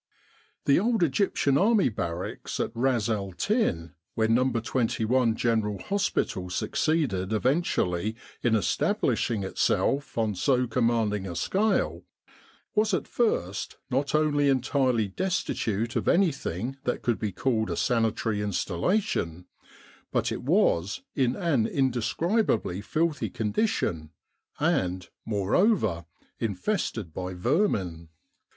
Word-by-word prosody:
The 140 - +5
old 225 -1 +2
Egyptian 140 -3 +2
Army 210 - +4
Barracks 85 -4 -4
at - - -1
Ras 120 -2 +1
el 100 -4 -2
Tin, 85 - 0 0.2
where 110 -1 +2
No. 125 +3 +3
21 115 0 +1
General 110 -3 0
Hospital 195 - -1
succeeded 105 - 0
eventually 110 - 0 0.3
in 120 -2 +2
establishing 105 +1 0
itself 140 +8 0
on 110 -2 +1
so 125 +7 +2
commanding 115 -4 0
a 85 - -5
scale, 195 - +1 0.7
was 215 -2 +2
at, - - -3
first 100 - -1
not 140 +3 0
only 145 -2 +3
entirely 130 -4 +2
destitute 115 - -2
of - - -1
anything 135 - +1
that 125 - -2
could 120 -2 0
be 105 -2 -2
called 110 +2 0
a - - -2
sanitary 115 -2 0
installation, 95 - -1 0.7
but - - 0
it - - -3
was 85 +4 +1
in 130 -2 +1
an 140 -11 +1
indescribably 130 - 0
filthy 150 -3 -1
condition 105 - -1 0.5
and, 90 0 0 0.2
moreover, 105 - +1 0.3
infested 110 - -2
by 90 +1 -4
vermin. 90 - 0
115 Hz, 110 wpm, -27 LUFS, 100-145 Hz, 0.7 s, The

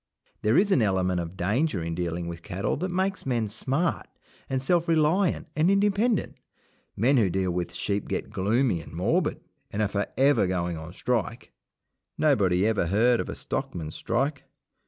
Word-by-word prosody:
There 110 +3 +3
is 200 +1 +3
an 145 - +4
element 95 -3 +1
of 85 +2 -6
danger 105 - 0
in 85 0 -3
dealing 85 0 -3
with 85 0 -6
cattle 95 +4 -2
that 185 +5 -2
makes 190 +2 -1
men 120 -5 -1
smart 135 - -1 0.4
and 130 - 0
self 170 +5 +1
reliant 165 +3 +2
and 155 +3 +3
independent. 205 +2 +1 0.6
Men 130 +7 +3
who 105 -6 +3
deal 95 0 0
with 90 0 -2
sheep 100 0 -2
get - - -3
gloomy 110 -1 +1
and - - -13
morbid, - - 0 0.3
and 100 - -5
are 105 - +2
for 100 0 -2
ever 135 -7 +4
going 90 -2 -1
on 80 +1 -8
strike. 120 +3 -2 0.7
Nobody 100 - +3
ever 110 -6 +1
heard 115 +6 +3
of - - -3
a - - -4
stockman's 80 -3 -4
strike. 140 +5 -1
110 Hz, 170 wpm, -26 LUFS, 90-150 Hz, 0.7 s, an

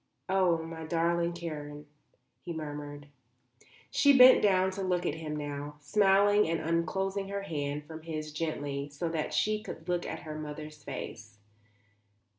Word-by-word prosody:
"Oh, 185 -3 +3
my 160 0 -7
darling 170 +1 +1
Karen," 150 -3 -6 0.6
he 170 - -5
murmured. 145 -2 -6 0.9
She 280 -1 +5
bent 255 0 +9
down 190 -2 +3
to 195 +1 -5
look 180 -2 0
at - - +1
him 155 -1 -5
now, 145 0 -5
smiling 200 +4 +4
and 165 0 0
unclosing 190 +4 -1
her 200 0 -3
hand 150 -4 -3
from 160 +1 -9
his 155 -2 -5
gently, 145 -3 -3
so 145 +4 -3
that 160 -2 -2
she 215 0 +1
could 160 -6 -9
look 175 -1 -1
at - - -5
her 155 -2 -6
mother's 150 0 -7
face. 110 -1 -7
165 Hz, 150 wpm, -30 LUFS, 150-185 Hz, 0.9 s, bent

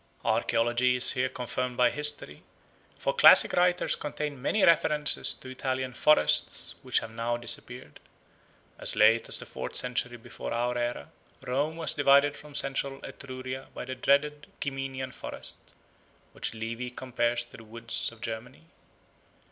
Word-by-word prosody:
Archaeology 120 +2 +2
is 125 - +5
here 130 -1 0
confirmed 125 0 -4
by 125 - +4
history; 150 0 -2 0.6
for - - -1
classical 470 - +7
writers 180 0 +2
contain 150 -2 -5
many 205 +10 +1
references 150 -2 +3
to - - -13
Italian 130 0 -3
forests 150 - +2
which - - 0
have 115 - -8
now 115 +1 -2
disappeared. 120 -6 -3 0.8
As - - -4
late 115 +2 +4
as - - -2
the - - -9
fourth - - -7
century 125 -1 0
before 115 - -7
our 120 +1 -1
era 120 -11 -3 0.3
Rome 145 +5 -1
was 165 - +1
divided 145 0 +4
from 150 -1 -13
central 135 0 -1
Etruria 130 0 -7
by - - -6
the 130 - -5
dreaded 145 +3 +1
Ciminian 135 -2 -4
forest, - - -3 0.6
which - - -4
Livy 115 +2 -4
compares 120 -1 -1
to - - -14
the 115 - -12
woods 115 +2 -3
of 115 -1 -17
Germany. 115 +6 -7
130 Hz, 145 wpm, -28 LUFS, 120-140 Hz, 0.8 s, classical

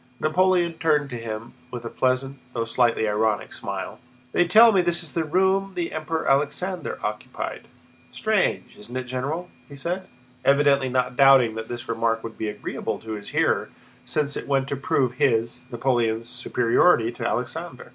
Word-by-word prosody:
Napoleon 175 +1 +2
turned 150 -3 +2
to - - -4
him 115 0 -6 0.2
with 120 -1 -7
a - - -3
pleasant, 130 +1 0
though 115 -2 -1
slightly 115 -2 +2
ironic, 105 -2 0
smile. - - -5 0.3
"They 175 - +2
tell 225 +6 +8
me 195 -3 +4
this 175 0 0
is 160 - -6
the 165 - 0
room 190 +4 +1
the 175 -2 -2
Emperor 160 +1 -3
Alexander 160 +7 0
occupied? 105 0 -5 0.4
Strange, - - 0
isn't 120 +5 -6
it, 130 - -2
General?" 140 +8 -4 0.2
he 140 - -10
said, 180 +6 -4 0.4
evidently 140 -1 +4
not 125 0 0
doubting 135 -4 +6
that 110 0 -6
this 120 +1 -6
remark 115 0 0
would 115 -1 -7
be 110 - -2
agreeable 105 - -4
to 110 - -9
his 105 -1 -6
hearer - - +1 0.3
since 145 -2 -1
it - - -5
went 135 -1 +1
to - - -1
prove 130 -2 0
his, 115 -2 +2
Napoleon's, 115 -2 0
superiority 120 +1 +2
to 120 - -8
Alexander. - - -4
130 Hz, 165 wpm, -24 LUFS, 115-160 Hz, 0.4 s, tell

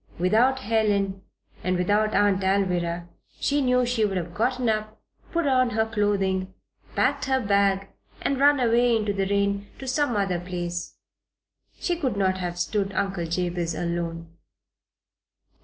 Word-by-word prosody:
Without 235 +9 +3
Helen, 205 -4 +1 0.4
and 185 0 +1
without 205 +4 +1
Aunt 205 -2 +3
Alvirah, 175 -3 0 0.3
she 290 0 +1
knew 250 -1 +3
she 240 -2 0
would 195 -3 0
have 170 -1 -4
gotten 250 +4 0
up, 215 0 -1 0.3
put 340 -2 0
on 255 -2 +3
her 220 -1 +1
clothing, 195 -4 0 0.4
packed 280 +2 +1
her 265 0 +2
bag, 200 -3 +2 0.4
and 275 -1 0
run 285 0 +5
away 240 0 +3
in 220 -1 0
the 195 -2 0
rain 200 0 0
to 265 - -8
some 260 -2 +1
other 195 -3 0
place. 175 -1 -5 0.8
She 350 - -1
could 260 -10 -1
not 190 -1 +1
have 175 -1 -3
stood 195 +2 -1
Uncle 190 -3 -1
Jabez 175 -1 -2
alone. 170 -1 -4
200 Hz, 145 wpm, -25 LUFS, 180-240 Hz, 0.8 s, run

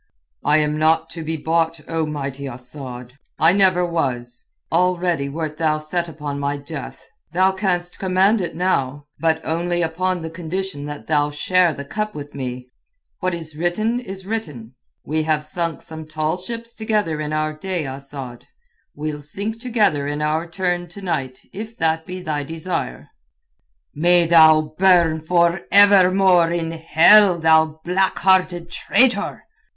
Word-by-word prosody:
"I 150 - +4
am 150 0 0
not 160 +1 +2
to 165 - -6
be 160 +1 -3
bought, 165 +1 0
O 160 -1 -1
mighty 140 -2 -5
Asad. 125 0 -9 0.2
I 160 +2 +4
never 185 -2 +3
was. 125 -8 -3 0.3
Already 175 -4 +1
wert 155 +1 -4
thou 155 -1 +1
set 170 +3 -3
upon 145 -2 -5
my 140 0 -2
death. 140 -1 -9 0.3
Thou 185 +2 +3
canst 180 -2 -2
command 190 +3 +2
it 175 - -4
now, 145 -6 -1
but 160 -1 +2
only 175 +2 -1
upon 175 +2 -1
the 160 - -6
condition 175 -2 -4
that 145 0 -7
thou 150 -2 +1
share 175 +4 +2
the 140 -1 -7
cup 210 +8 -4
with 145 -1 -8
me. 125 -2 -6 0.5
What 185 -2 -1
is 160 -2 -9
written 215 +9 0
is 190 -6 -9
written. 150 - -5 0.3
We 155 +2 0
have 155 -1 0
sunk 165 0 -3
some 160 -1 -9
tall 155 +1 -1
ships 230 +5 -6
together 210 -9 -1
in 150 0 -4
our 155 0 -1
day, 180 0 -4
Asad. 135 -2 -8 0.5
We'll 150 0 -4
sink 205 +9 -5
together 210 - +1
in 145 0 -3
our 155 +3 -1
turn 175 -1 -2
to 195 +4 -11
night 130 -8 -3
if 220 +3 -8
that 160 0 0
be 185 0 -7
thy 150 -3 -2
desire." 160 - -5 0.8
"May 175 +3 +4
thou 160 -2 +7 0.2
burn 170 -4 +4
for 170 +1 +2
evermore 190 -3 +5
in 165 -1 -2
hell, 170 +4 +5
thou 160 -1 +3
black 190 +2 +1
hearted 180 -2 +2
traitor!" 245 +4 +2
165 Hz, 155 wpm, -21 LUFS, 150-185 Hz, 0.8 s, thou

